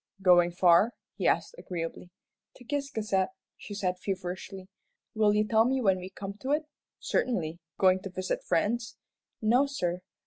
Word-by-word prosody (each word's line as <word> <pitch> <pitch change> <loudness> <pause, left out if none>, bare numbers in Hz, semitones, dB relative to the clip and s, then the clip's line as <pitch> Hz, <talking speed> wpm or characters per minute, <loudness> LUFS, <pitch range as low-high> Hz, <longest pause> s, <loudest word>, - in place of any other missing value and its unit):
"Going 175 -2 +6
far?" 175 +6 +5 0.2
he - - -1
asked, - - +1
agreeably. 170 0 -5 0.5
"To 245 - -15
Ciscasset," 225 -9 -1 0.3
she 205 - -9
said, 185 -2 -1
feverishly. 185 0 -5 0.5
"Will 215 -2 +3
you 210 0 +2
tell 220 0 +4
me 260 +3 +1
when 195 -6 +2
we 185 +1 -7
come 195 +1 -7
to 270 +2 -1
it?" 305 +1 +1 0.3
"Certainly. 170 -9 -1 0.2
Going 185 -1 +4
to 195 - -6
visit 185 0 -3
friends?" 225 +6 0 0.5
"No, 245 +6 +4
sir." 180 -10 -2
195 Hz, 150 wpm, -29 LUFS, 180-230 Hz, 0.5 s, Going